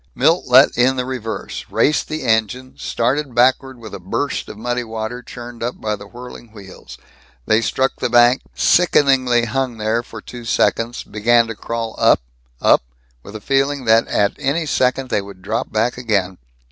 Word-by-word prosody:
Milt 160 +7 +2
let 130 +2 +6
in 125 +2 +3
the 125 -1 -2
reverse, 125 -4 -5
raced 150 - +1
the 155 0 -5
engine, 120 +2 0
started 130 +2 -2
backward 130 +2 +2
with 110 -3 -11
a - - -6
burst 100 +10 -3
of - - -9
muddy 120 +2 -2
water 110 +2 -5
churned 120 0 -10
up 120 +2 -4
by 105 -1 -2
the 100 0 -12
whirling 120 +1 -11
wheels. 95 -4 -12 0.5
They 110 +1 +3
struck 130 +3 0
the - - -1
bank, 120 +2 +5
sickeningly 135 -8 +3
hung 125 +1 -2
there 110 +2 0
for 115 -2 -11
two 120 +3 -10
seconds, 115 0 0
began 115 +2 +2
to 115 -1 -6
crawl 115 +1 -4
up, - - +5 0.4
up, - - +4 0.4
with 100 - -12
a 110 - -7
feeling 135 +2 0
that 115 0 +4
at 100 -1 +1
any 150 +5 -1
second 130 -2 0
they 105 - +1
would 100 -2 -13
drop - - -3
back 125 +1 0
again. 100 -6 -1
120 Hz, 175 wpm, -19 LUFS, 110-130 Hz, 0.5 s, let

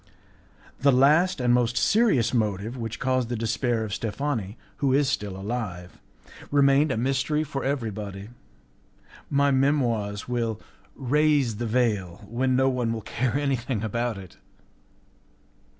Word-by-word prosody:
The 140 +1 +4
last 150 +8 +4
and 120 -1 +2
most 120 0 +1
serious 210 - +3
motive 110 0 -1
which 115 -2 -5
caused 130 -2 0
the 120 - -2
despair 115 +1 -1
of 105 -2 -5
Steffani, 110 -1 -3 0.2
who 135 -2 +1
is 140 +1 +3
still 105 -8 -2
alive, 95 -4 -5 0.5
remained 140 +1 +4
a 130 - -1
mystery 135 +5 0
for 140 -3 -5
everybody. 105 -7 -4 1.0
My 140 0 +3
Memoirs 120 -7 0
will 115 -3 -2 0.4
raise 140 -3 +1
the 120 +1 -3
veil 105 -5 -1
when 130 +3 0
no 130 +1 +3
one 125 -3 0
will 115 - -4
care 120 0 -2
anything 130 -5 -1
about 115 +1 -2
it. 95 -3 -12
120 Hz, 135 wpm, -25 LUFS, 110-135 Hz, 1.0 s, The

